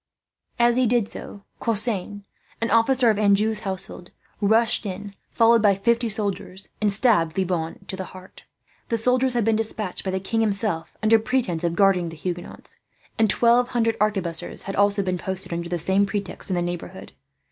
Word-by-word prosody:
As 240 0 +3
he 255 -1 +3
did 235 -2 +1
so, 200 -2 -8 0.2
Cosseins, 210 -3 -1 0.4
an 230 - -2
officer 235 +1 +4
of 210 - -2
Anjou's 210 +1 +2
household 190 -3 -4 0.3
rushed 220 +3 +3
in, 200 0 -6 0.2
followed 230 -1 +4
by 205 -2 +4
fifty 235 +4 +1
soldiers, 200 -2 -3
and 210 -1 +3
stabbed 195 -7 +2
Le 190 - +1
Bonne 165 -3 -3
to 190 - -5
the 190 0 -5
heart. 185 0 -13 0.5
The 230 - +1
soldiers 250 +3 +2
had 235 -3 +1
been 225 -1 +3
despatched 215 -3 -2
by 190 - -3
the 190 0 -1
king, 225 +4 -1
himself, 200 -5 -2
under 220 +1 +5
pretence 220 -8 -1
of 170 -1 0
guarding 190 -3 +3
the 165 - -10
Huguenots; 175 +2 -7 0.4
and 220 -1 +3
twelve 240 +3 +4
hundred 230 -2 +1
arquebusiers 190 -6 -2
had 195 - -5
also 200 0 +2
been 185 -1 -2
posted, 190 -1 -3
under 170 0 -4
the 175 - -1
same 190 +4 +2
pretext, 200 -1 -4
in 185 - 0
the 175 - 0
neighbourhood. 175 0 -6
205 Hz, 180 wpm, -23 LUFS, 185-225 Hz, 0.5 s, under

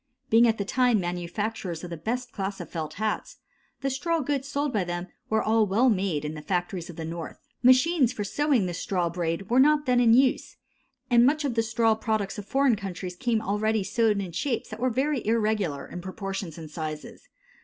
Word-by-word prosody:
Being 230 +2 +6
at 225 -1 +2
that 200 - -3
time 250 -3 +3
manufacturers 175 +1 -3
of 175 - -7
the - - -3
best 245 +9 -3
class 195 0 -4
of - - -8
felt 160 -3 -4
hats, 215 +2 -3 0.4
the 275 - 0
straw 330 +5 0
goods 275 -1 -2
sold 285 0 -1
by 205 -4 +1
them 175 +1 -4 0.2
were 220 0 +2
all 220 +2 +3
made 185 -7 -1
in 150 - -3
the 155 - -7
factories 175 +1 -2
of 175 - -8
the 165 -1 -5
North. 165 0 -6 0.2
Machines 255 +2 +5
for 220 -5 -4
sewing 270 0 +1
the 175 - -3
straw 175 0 -1
braid 170 +3 -3
were 250 - +5
not 295 +2 +4
then 250 -2 +3
in 230 -2 +6
use, 260 0 +2 0.5
and 240 0 +6
much 295 +4 +3
of 270 - 0
the 225 - +2
straw 225 0 +2
products 215 -2 -2
of 205 - -9
foreign 270 -3 +3
countries 185 -3 -6
came 225 +1 0 0.2
ready 215 -1 +1
sewed 220 0 +1
in 190 -3 -4
shapes 235 - -2
that 215 - -7
were 255 +2 +1
very 265 +1 0
irregular 210 -9 0
in 175 - -8
proportions 190 -2 -5
and 160 -2 -9
sizes. 155 -1 -6
215 Hz, 205 wpm, -26 LUFS, 180-245 Hz, 0.5 s, Being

